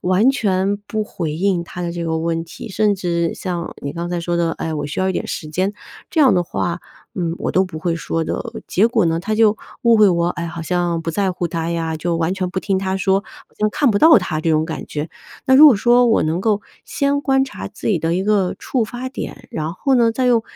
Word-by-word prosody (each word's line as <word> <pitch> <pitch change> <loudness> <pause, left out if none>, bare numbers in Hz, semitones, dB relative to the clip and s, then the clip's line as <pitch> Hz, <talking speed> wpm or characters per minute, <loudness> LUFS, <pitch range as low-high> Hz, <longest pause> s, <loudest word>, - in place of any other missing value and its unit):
完 185 +6 +3
全 200 -5 0
不 215 -1 -1
回 165 -6 -4
应 180 +2 0
他 175 - -9
的 170 -1 -3
这 170 0 -4
个 160 -1 -1
问 165 0 -1
题， 175 +7 -9
甚 210 +1 +2
至 170 -3 -1
像 175 -2 -4
你 140 - -4
刚 170 +2 -4
才 175 - -1
说 170 0 -2
的：‘’ 170 -1 +1
哎， 160 -1 -3
我 150 - -3
需 145 - -5
要 190 - +1
一 190 - 0
点 - - -2
时 155 - -4
间。‘’ 185 +6 -1 0.4
这 320 - +1
样 275 -4 +6
的 180 - +2
话， 175 0 -3 0.3
嗯， 170 -2 -2
我 - - -2
都 185 - +3
不 180 -4 -7
会 165 +1 -1
说 165 0 -2
的。 - - -3 0.2
结 210 +5 +3
果 235 - +2
呢， 165 0 0
他 215 +4 -2
就 220 -1 +4 0.3
误 235 -1 +5
会 210 -2 +6
我， 170 -2 +1
哎， 170 - -4
好 165 +1 -7
像 175 0 -1
不 165 0 -4
在 195 0 +1
乎 180 -1 -2
他 165 0 -3
呀， 165 -1 -2
就 170 +2 -1
完 165 +3 0
全 185 -1 -2
不 185 - -2
听 195 0 0
他 190 0 -1
说， 195 0 +2
好 205 - -17 0.2
像 215 - +3
看 270 +1 +2
不 - - +1
到 320 -6 +7
他 155 -5 -3
这 165 - 0
种 155 0 +2
感 160 0 -5
觉。 150 +2 -4 0.4
那 260 - +5
如 295 +4 +10
果 255 - +5
说 240 +4 +4
我 225 - +3
能 160 +3 -1
够， 210 +1 +1 0.2
先 280 0 0
观 270 -1 +2
察 270 - -7
自 - - -9
己 210 - +3
的 165 +1 0
一 190 - -1
个 205 -3 +1
触 245 -4 -1
发 245 +3 -6
点， 260 - -7
然 160 +1 -3
后 270 +7 0
呢， 235 -2 +4
再 255 +3 -1
用 235 -2 +3
185 Hz, 275 characters per minute, -19 LUFS, 170-215 Hz, 0.4 s, 如